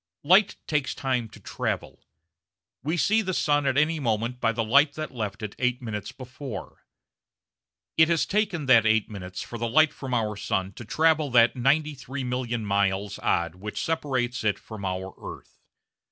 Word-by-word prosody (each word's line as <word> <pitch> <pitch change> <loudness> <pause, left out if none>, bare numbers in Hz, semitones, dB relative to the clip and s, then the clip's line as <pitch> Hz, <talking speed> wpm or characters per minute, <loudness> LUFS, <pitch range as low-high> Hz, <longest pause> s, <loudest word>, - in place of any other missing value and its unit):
Light 185 +7 +5
takes 150 -3 -1
time 125 -4 -1
to 110 - -14
travel. 100 - -4 0.8
We 160 +5 -1
see 215 +9 +3
the 185 -3 -2
sun 145 -2 +2
at 135 0 +1
any 155 +2 +2
moment 115 -1 -1
by 115 - +3
the 115 0 -1
light 140 +6 +4
that 155 0 -5
left 105 -3 -4
it 105 - -4
8 125 -1 +1
minutes 105 -5 -5
before. 130 -1 -9 1.1
It 160 0 +6
has 170 -2 +2
taken 195 -7 0
that 115 -4 +6
8 110 0 +2
minutes 90 -2 -6
for 115 - -8
the 115 0 -1
light 155 +5 +4
from 135 - -7
the 110 -4 0
sun 95 -1 -2
to 120 - -10
travel 155 +4 +2
that 120 -1 +5
93,000,000 130 -3 -1
miles 100 -1 0
odd 85 -1 0
which 105 +4 -6
separates 130 -7 -1
it 105 -2 +1
from 105 -3 -9
our 95 0 -3
earth. - - -10
125 Hz, 170 wpm, -26 LUFS, 110-145 Hz, 1.1 s, It